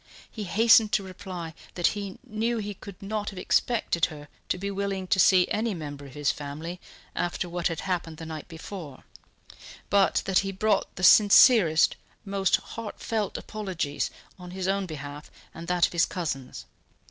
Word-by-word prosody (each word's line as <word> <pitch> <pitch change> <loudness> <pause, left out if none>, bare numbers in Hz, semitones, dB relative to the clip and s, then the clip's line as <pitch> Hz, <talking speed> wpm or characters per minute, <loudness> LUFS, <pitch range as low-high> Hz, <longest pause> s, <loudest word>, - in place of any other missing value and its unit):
He 215 -3 -5
hastened 220 +2 +5
to 200 - +2
reply 185 -3 -7 0.2
that 175 - -1
he 200 -2 -6
knew 230 0 -1
he 205 -1 -4
could 200 -1 -12
not 210 +1 -2
have 195 - -11
expected 180 -3 +1
her 145 -2 -9 0.2
to - - 0
be 200 +2 -3
willing 195 -1 -2
to 190 - +1
see 185 -1 +6
any 220 -1 -1
member 145 -3 -7
of 135 - -14
his 145 -1 +1
family 155 +5 -7 0.3
after 175 +1 -2
what 175 0 -1
had 165 -2 -3
happened 175 -4 -3
the 165 - -8
night 160 -2 -7
before, 165 -4 -9 0.9
but 200 -1 +3
that 190 -1 +3
he 195 -1 -2
brought 200 +1 0
the 185 - -7
sincerest, 200 - +7 0.3
most 195 -1 +2
heartfelt 220 -1 -4
apologies 185 -9 -3 0.3
on 180 0 -9
his 185 +1 -4
own 195 0 0
behalf 145 -1 -8 0.2
and 165 +1 -9
that 180 0 +3
of - - -5
his 170 - +3
cousins. 135 -8 -5
185 Hz, 170 wpm, -27 LUFS, 165-200 Hz, 0.9 s, sincerest